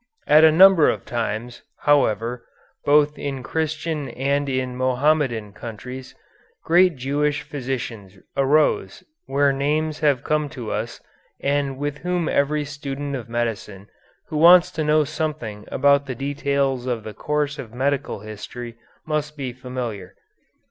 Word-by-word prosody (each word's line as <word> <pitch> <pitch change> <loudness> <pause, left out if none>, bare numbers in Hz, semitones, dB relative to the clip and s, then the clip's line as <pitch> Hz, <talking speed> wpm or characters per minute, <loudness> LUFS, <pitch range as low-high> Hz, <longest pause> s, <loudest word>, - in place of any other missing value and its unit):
At 155 +2 +6
a 160 - +8
number 185 -1 +7
of - - -3
times, 115 0 -3 0.2
however, 120 -4 +2 0.4
both 150 +1 +3
in 135 -3 -4
Christian 155 0 -2
and 140 +2 -1
in 130 -1 -2
Mohammedan 130 -4 +1
countries, 125 +4 -8 0.5
great 175 +1 +4
Jewish 145 +3 -1
physicians 125 -8 -5 0.2
arose 140 -8 +2 0.2
whose 140 0 +2
names 150 +3 -1
have 145 -5 +2
come 150 -1 0
to 115 -4 -5
us 115 +2 -4 0.4
and 140 -1 0
with 145 +1 -3
whom 180 -1 -1
every 145 +1 +1
student 145 -1 -5
of 120 -3 -7
medicine 110 -4 -3 0.4
who 155 - -3
wants 175 +3 +7
to 155 - -2
know 150 0 +3
something 145 -9 -4
about 140 0 +3
the 130 - -4
details 140 -1 -1
of 120 -3 -2
the 110 - -7
course 150 +2 -2
of 115 -5 -7
medical 130 -3 -1
history 115 +3 -8 0.3
must 150 -1 -2
be 130 -3 -4
familiar. 125 -6 -6
140 Hz, 135 wpm, -22 LUFS, 120-150 Hz, 0.5 s, a